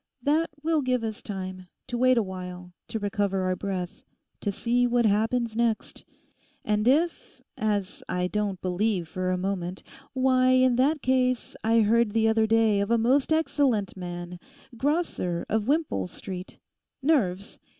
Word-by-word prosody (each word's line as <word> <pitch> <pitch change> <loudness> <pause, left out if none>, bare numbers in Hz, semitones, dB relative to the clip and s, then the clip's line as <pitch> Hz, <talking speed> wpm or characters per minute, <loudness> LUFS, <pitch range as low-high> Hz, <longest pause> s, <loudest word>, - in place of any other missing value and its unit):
That 310 +4 +2
will 320 -1 +2
give 255 -3 0
us 220 0 -4
time; 185 -2 -6 0.2
to 245 - -5
wait 255 +1 +4
a 230 - +3
while, 180 -1 -8
to - - -3
recover 200 -2 -1
our 185 0 0
breath, 185 -2 -4 0.4
to 205 - -1
see 245 +4 +1
what 240 -1 +2
happens 225 +2 +1
next. 230 -1 -1 0.6
And 210 +1 +1
if—as 215 - -1
I 180 0 0
don't 200 0 -2
believe 185 -1 0
for 185 +3 -3
a 185 - +1
moment—Why, 255 +8 -1
in 255 -1 +4
that 285 +4 +2
case 255 -1 +1
I 225 +1 +4
heard 220 0 +3
the 225 0 +3
other 220 0 +3
day 220 -2 +3
of 200 +1 -1
a 235 - +4
most 255 +6 +2
excellent 275 -10 +1
man—Grosser, 180 - -3
of 220 +1 -1
Wimpole 285 - 0
Street; 185 - -8 0.5
nerves. 200 - 0
220 Hz, 145 wpm, -26 LUFS, 185-255 Hz, 0.6 s, wait